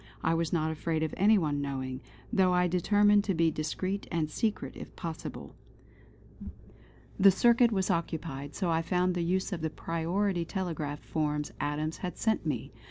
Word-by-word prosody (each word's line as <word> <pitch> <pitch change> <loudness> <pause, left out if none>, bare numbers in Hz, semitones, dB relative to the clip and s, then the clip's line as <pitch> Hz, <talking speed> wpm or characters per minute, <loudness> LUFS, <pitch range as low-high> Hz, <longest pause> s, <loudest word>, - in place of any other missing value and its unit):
I 165 - +2
was 165 -1 0
not 160 -2 +1
afraid 160 0 -1
of 160 - -2
any 210 +3 +5
one 150 -5 0
knowing, 130 -2 -4 0.3
though 185 -1 +4
I 180 0 +3
determined 205 +4 +4
to 195 - 0
be 165 0 +3
discreet 185 +6 -3
and 160 -3 -1
secret 215 +6 -2
if - - -10
possible. 165 -2 -6 1.7
The 195 +1 +8
circuit 235 +4 +4
was 190 -3 +1
occupied, 155 -4 -3
so 180 -4 0
I 165 0 +2
found 180 +2 +1
the 175 - -1
use 185 +3 0
of 170 - -4
the 160 - -1
priority 170 +4 -1
telegraph 160 -5 -3
forms 150 -1 -1
Adams 150 +2 -2
had 180 -1 -5
sent 220 -7 0
me. 135 -7 -2
170 Hz, 165 wpm, -30 LUFS, 155-190 Hz, 1.7 s, The